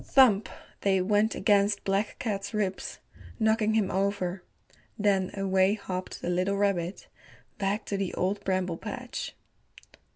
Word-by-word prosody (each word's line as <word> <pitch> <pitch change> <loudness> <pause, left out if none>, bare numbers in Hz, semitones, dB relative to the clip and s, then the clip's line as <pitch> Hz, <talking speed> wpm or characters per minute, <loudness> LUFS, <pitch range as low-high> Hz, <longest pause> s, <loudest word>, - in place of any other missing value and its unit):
Thump! 230 -6 +5 0.3
they 195 -1 +2
went 205 +3 +2
against 205 -1 +3
Black 195 +2 0
Cat's 200 -3 -3
ribs, 195 -3 -2 0.4
knocking 220 0 +2
him 210 -4 +2
over. 195 -1 -1 0.6
Then 195 -3 +2
away 190 0 +3
hopped 185 -3 -5
the - - -1
little 185 +3 +1
rabbit 195 -3 0 0.5
back 200 +2 0
to 200 - -2
the 195 -2 -1
Old 200 +2 -1
Bramble 185 -3 0
Patch. - - -6
200 Hz, 130 wpm, -28 LUFS, 190-205 Hz, 0.6 s, Thump